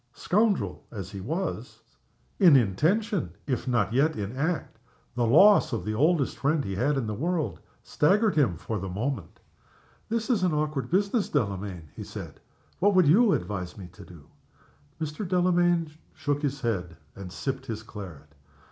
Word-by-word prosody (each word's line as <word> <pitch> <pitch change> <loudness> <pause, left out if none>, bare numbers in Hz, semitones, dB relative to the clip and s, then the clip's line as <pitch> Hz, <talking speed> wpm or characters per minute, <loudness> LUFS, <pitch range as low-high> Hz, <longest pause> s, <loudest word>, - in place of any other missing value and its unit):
Scoundrel 210 0 0
as 100 -4 -7
he 100 - -7
was 165 - -4 0.6
in 175 -7 +7
intention, 160 - +1
if 130 -2 -2
not 115 -4 +1
yet 150 +5 +2
in 105 +3 -4
act 160 +5 -2 0.3
the 120 -1 0
loss 195 - +6
of 100 -6 -3
the 110 - -2
oldest 150 +4 +1
friend 145 +1 +1
he 95 - -3
had 135 +9 +1
in 130 - -1
the 110 - -3
world 165 - -2 0.2
staggered 205 +7 +2
him 125 - +2
for 105 +6 -4
the 95 +1 -5
moment. 105 - -4 0.7
"This 230 +2 -1
is 220 -6 +2
an 180 -3 +2
awkward 150 -5 -2
business, 200 +4 +1
Delamayn," 100 - -2
he - - -7
said. - - -9 0.4
"What 200 +1 +3
would 185 -2 +6
you 205 +7 +5
advise 90 -1 -3
me 90 -3 -9
to 90 - -14
do?" 85 -5 -14 0.7
Mr. 155 +5 -4
Delamayn 175 -3 +2 0.2
shook 145 0 -1
his 140 -2 -2
head, 90 -8 -2 0.2
and 95 -2 -8
sipped 135 +6 -4
his 110 -2 -5
claret. 85 -10 -10
135 Hz, 165 wpm, -27 LUFS, -, 0.7 s, in